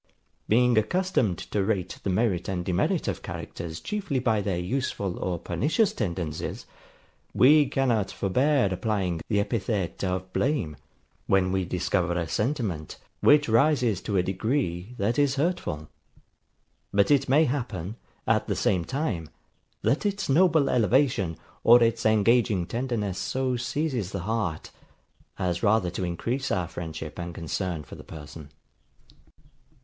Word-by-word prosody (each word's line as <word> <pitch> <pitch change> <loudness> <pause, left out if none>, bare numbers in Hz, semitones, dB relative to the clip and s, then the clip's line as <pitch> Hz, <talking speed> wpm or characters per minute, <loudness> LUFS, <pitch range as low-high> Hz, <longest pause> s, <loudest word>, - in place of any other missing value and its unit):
Being 120 +1 +4
accustomed 115 - 0
to 100 - +1
rate 95 -4 -2
the - - -2
merit 95 -2 0
and 90 -2 -2
demerit 90 -1 0
of - - -2
characters 80 -1 -6
chiefly 195 - -3
by 110 -4 +1
their 95 -3 -1
useful 100 -1 -2
or 90 -2 -1
pernicious 150 - +1
tendencies, 85 - -3 0.7
we 145 +3 +6
cannot 120 -8 +1
forbear 125 +6 +2
applying 95 -5 -1
the 105 - +1
epithet 100 -4 -2
of 95 0 -2
blame, 130 - 0 0.5
when 95 -1 +3
we 95 -1 0
discover 90 0 0
a 85 -1 -2
sentiment, 105 - -2 0.2
which 145 0 +5
rises 120 - +3
to 100 -3 -1
a 90 - +3
degree, 95 0 -2
that 110 +7 0
is 140 -2 +3
hurtful; 140 - -1 1.0
but 100 +3 +3
it 140 -2 +3
may 150 +4 +5
happen, 115 - -3 0.3
at - - +2
the - - 0
same 90 -4 +1
time, 115 - -3 0.5
that 140 - +2
its 205 -1 -1
noble 160 0 +4
elevation, 115 - +2 0.3
or 120 +1 +7
its 115 -1 +2
engaging 110 -3 +3
tenderness 110 -3 -2
so 130 -1 -1
seizes 120 - -2
the 100 - -3
heart, 95 -5 -2 0.7
as 90 -1 -1
rather 100 -4 +2
to - - -4
increase 120 +10 -2
our 90 -3 0
friendship 80 -1 -7
and 85 -1 -5
concern 85 0 -3
for - - -13
the - - -9
person. 75 -1 -10
105 Hz, 140 wpm, -26 LUFS, 90-130 Hz, 1.0 s, or